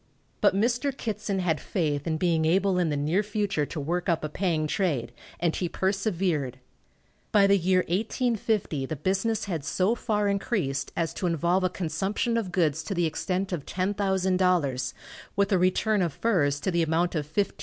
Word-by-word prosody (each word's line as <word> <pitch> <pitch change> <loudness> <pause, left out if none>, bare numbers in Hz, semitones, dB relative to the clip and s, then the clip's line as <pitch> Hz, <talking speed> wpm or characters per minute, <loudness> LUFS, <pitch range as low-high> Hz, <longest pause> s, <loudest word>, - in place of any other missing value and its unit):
But - - +4
Mr. 240 +7 +1
Kittson 210 -6 -3
had 160 -5 0
faith 150 -6 -1
in 160 -1 0
being 165 -1 +1
able 185 +3 +2
in 175 -3 +2
the 145 - -1
near 155 +7 +1
future 205 -7 -1
to 160 - -5
work 175 +6 -1
up 165 -2 +1
a 155 - -2
paying 165 -2 0
trade, 150 - -1 0.3
and 170 -1 +1
he 175 - -1
persevered. 185 - -1 0.7
By 205 -1 +5
the 200 0 +5
year 185 0 +3
1850 210 - -1
the 155 - -3
business 195 +8 0
had 170 -7 -3
so 185 +7 +1
far 210 -3 0
increased 195 - -1
as 165 -1 0
to 180 - -2
involve 175 +3 +1
a 185 - +2
consumption 190 +7 -1
of 220 -6 -1
goods 160 -4 +1
to 195 - -3
the 175 -1 +2
extent 185 +4 -2
of 150 -5 -4
$10,000, 185 - +1 0.4
with 200 +1 +1
a 190 - +4
return 195 +3 +2
of 170 -5 0
furs 150 -11 +1
to 190 - 0
the 170 -1 +2
amount 165 +2 +1
of 150 -4 -2
$15,000. 200 +3 +1
180 Hz, 180 wpm, -27 LUFS, 160-200 Hz, 0.7 s, By